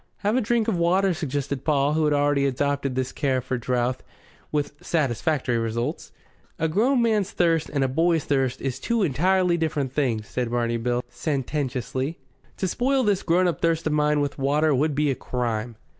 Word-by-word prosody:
"Have 210 +3 +2
a 255 - +3
drink 230 0 +1
of 220 - +1
water," 185 +3 +3
suggested 140 -3 -3
Paul, 145 -1 +2
who 155 0 +2
had 150 - +2
already 145 -1 +2
adopted 140 0 -1
this 130 0 -1
care 135 -3 0
for 130 0 -3
drouth, 125 +1 0 0.5
with 145 -1 -1
satisfactory 135 -4 0
results. 115 +7 -3 0.5
"A 160 - 0
grown 235 - +2
man's 215 -4 +1
thirst 165 -4 +1
and 140 -2 +1
a - - +2
boy's 165 +3 +2
thirst 135 -3 0
is 135 -1 -3
two 230 +7 0
entirely 180 +3 +2
different 150 -5 -1
things," 115 -8 0
said 125 +3 -2
Barney 120 -1 0
Bill 120 +1 -1
sententiously. 135 0 -3 0.4
"To 190 - -1
spoil 260 +7 +1
this 205 -4 +2
grown 180 +2 +2
up 175 - -2
thirst 165 -1 +1
of 155 - +1
mine 150 0 +2
with 145 0 -3
water 150 +3 +2
would 145 +2 +1
be 150 0 +2
a - - +1
crime." 120 -2 -3
145 Hz, 185 wpm, -24 LUFS, 130-170 Hz, 0.5 s, a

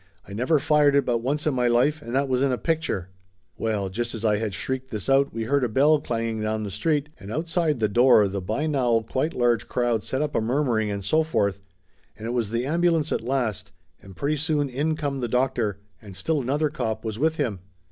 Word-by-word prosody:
"I 100 - -9
never 125 +9 +2
fired 145 0 +3
it 140 - +3
but 120 -2 +1
once 140 +6 -2
in 155 - +2
my 125 -1 +1
life 130 +6 +2
and 120 -2 -5
that 140 +1 +2
was 130 -1 0
in 140 -1 +2
a 125 - 0
picture 155 - -2 0.2
!" 80 -6 -44
Well, 105 -3 -1
just 120 +5 -3
as 110 0 -4
I 105 -1 +3
had 105 -3 -3
shrieked 130 +7 -4
this 105 -5 -4
out 135 +1 +3
we 115 - -3
heard 140 +4 +1
a 125 - +1
bell 145 +7 +4
clanging 115 -4 -3
down 110 0 -1
the 100 - -5
street, 145 - 0
and 100 +1 -9
outside 160 0 0
the 110 - +2
door 120 0 +5
the 100 0 -4
by 110 +11 -2
now 120 -7 +1
quite 150 +6 -1
large 120 -3 +1
crowd 120 -3 0
set 130 +6 -2
up 150 - -3
a - - +1
murmuring 115 -3 0
and 100 -1 -4
so 155 +10 +3
forth, 100 - 0 0.6
and 110 - -8
it 115 - -2
was 120 -4 -1
the 115 +3 -1
ambulance 165 0 +1
at - - 0
last, 120 -4 -2 0.3
and 95 -1 -13
pretty 150 +2 0
soon 150 -1 0
in 150 +5 0
come 145 -3 -3
the 120 - -2
doctor, 120 -4 0 0.2
and 100 -3 -11
still 150 - -1
another 145 +4 0
cop 110 -6 -3
was 110 0 -4
with 160 +2 +2
him. 120 -11 -2
125 Hz, 235 wpm, -25 LUFS, 110-145 Hz, 0.6 s, door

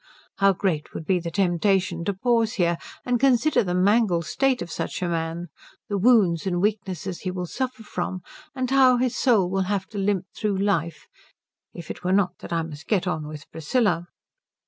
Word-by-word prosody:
How 195 0 +5
great 175 -5 -2
would 160 - -5
be 185 +2 +2
the 170 0 -4
temptation 180 0 +1
to 200 - 0
pause 230 +1 +1
here 170 -3 +1 0.3
and 245 -1 +1
consider 270 +2 +3
the 180 -2 -2
mangled 190 -2 +3
state 270 - +1
of 170 - -10
such - - -3
a - - 0
man, 165 0 -3 0.4
the 205 - 0
wounds 195 -6 +4
and 175 -2 0
weakness 195 -3 -1 0.2
he 185 - -4
will 180 -1 -3
suffer 255 +4 -4
from, 185 -3 -4 0.3
and 255 -1 -2
how 260 -2 +6
his 250 0 0
soul 220 -8 +3
will 190 +1 0
have 200 -2 0
to 205 - -5
limp 195 -2 0
through 210 -3 -1
life, 170 -5 -1 0.7
if 170 -2 -8
it - - -9
were 180 +1 +1
not 190 -2 +1
that - - -10
I 165 -1 0
must 160 -1 -9
get 195 -5 +1
on 155 -4 -2
with 150 -1 -9
Priscilla. 175 +1 0
190 Hz, 190 wpm, -24 LUFS, 170-220 Hz, 0.7 s, how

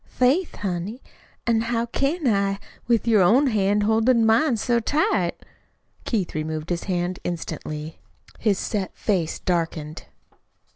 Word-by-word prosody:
"Faith, 280 +9 +1
honey, 195 +4 -4 0.5
an' 230 -1 +2
how 230 0 0
can 275 +7 -1
I, 200 -3 +2 0.3
with 235 -1 +2
your 220 -4 +5
own 235 +11 +5
hand 205 -4 +2
holdin' 225 +2 +3
mine 230 +3 +3
so 235 +2 +1
tight?" 215 - +1 0.7
Keith 205 -7 -1
removed 155 +1 -3
his 170 - -2
hand 180 -1 -1
instantly. 160 -2 -5 0.4
His 210 -4 +2
set 200 -4 -3
face 180 -6 0
darkened. 165 -3 -2
210 Hz, 130 wpm, -24 LUFS, 175-235 Hz, 0.7 s, your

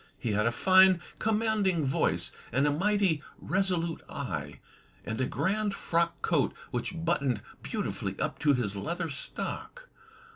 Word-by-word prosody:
He 115 - -2
had 105 +2 +2
a - - +2
fine, 185 +7 +6 0.2
commanding 215 -7 +1
voice, 135 - +2 0.2
and 135 +5 +2
a 145 - +3
mighty 190 -1 +2 0.2
resolute 180 -3 0
eye, 80 - -4 0.5
and 110 +4 -3
a 130 - +1
grand 200 +8 0
frock 170 0 0
coat 160 -5 +2 0.2
which 165 +7 -3
buttoned 140 -10 +1 0.2
beautifully - - -3
up - - -2
to 145 -1 +4
his 105 -5 -1
leather 165 - -3
stock. - - -5
165 Hz, 140 wpm, -29 LUFS, 130-190 Hz, 0.5 s, fine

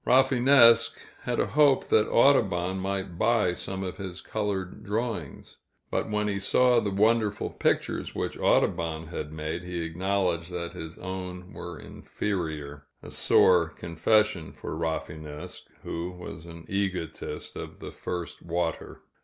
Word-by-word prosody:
Rafinesque 125 -2 +6 0.3
had - - -1
a - - +3
hope 145 -2 +4
that 105 -1 +4
Audubon 95 -8 +3
might 95 -2 -3
buy 115 -7 +3
some 95 +1 -4
of 90 - -5
his 95 -3 -6
colored 100 -3 -3
drawings; 105 - -4 0.3
but - - -1
when 105 0 0
he 100 -1 -1
saw 125 +5 +4
the 105 - -1
wonderful 105 +1 +2
pictures - - -1
which - - -2
Audubon 80 -1 +1
had 75 -3 -5
made, 80 +2 -4
he 90 -1 -4
acknowledged 90 0 -1
that 85 -1 -4
his 80 -2 -8
own 90 0 -6
were 85 -2 -7
inferior 75 -7 -4 0.2
a - - -9
sore 85 -3 +4
confession 85 +3 +1
for - - -6
Rafinesque, 80 -2 -5 0.2
who 85 +2 -3
was 90 -2 -9
an 85 -1 -10
egotist 95 -4 -3
of - - -7
the - - -8
first 90 -2 -5
water. 85 -1 -3
90 Hz, 135 wpm, -27 LUFS, 85-105 Hz, 0.3 s, Rafinesque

